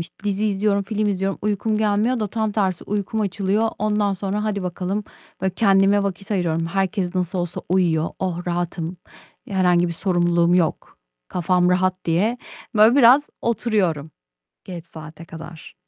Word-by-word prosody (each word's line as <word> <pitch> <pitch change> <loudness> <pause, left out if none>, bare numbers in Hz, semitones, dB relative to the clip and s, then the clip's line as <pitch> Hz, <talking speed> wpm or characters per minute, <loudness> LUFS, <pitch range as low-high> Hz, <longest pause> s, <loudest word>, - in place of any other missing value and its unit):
işte, 165 - -8
dizi 205 +1 0
izliyorum, 200 0 +1
film 210 +1 -1
izliyorum, 195 0 -1
uykum 210 +1 0
gelmiyor 220 +3 +1
da 210 - 0
tam 220 0 -2
tersi 190 -4 -1
uykum 210 +2 -2
açılıyor. 200 +2 0
Ondan 210 -2 +1
sonra 200 +2 -3
hadi 200 -3 -2
bakalım! 185 +3 -3 0.4
Böyle, 190 -1 0
kendime 200 -1 +4
vakit 195 +1 -4
ayırıyorum. 165 -4 0
"Herkes 190 +1 -1
nasıl 180 +1 -1
olsa 175 -2 -3
uyuyor. 170 -3 +1
Oh, 180 -2 -3
rahatım! 175 0 -3 0.5
İ - - -9
herhangi 180 -2 +3
bir - - -3
sorumluluğum 175 -1 +2
yok, 170 - -1 0.3
kafam 180 0 +1
rahat." 185 0 +1
diye, 205 +9 +1 0.4
böyle, 220 +4 +6
biraz 275 +3 +6 0.2
oturuyorum 200 -10 0 0.5
geç 175 -3 -8
saate 160 0 -11
kadar. 165 0 -11
190 Hz, 150 wpm, -22 LUFS, 175-210 Hz, 0.5 s, böyle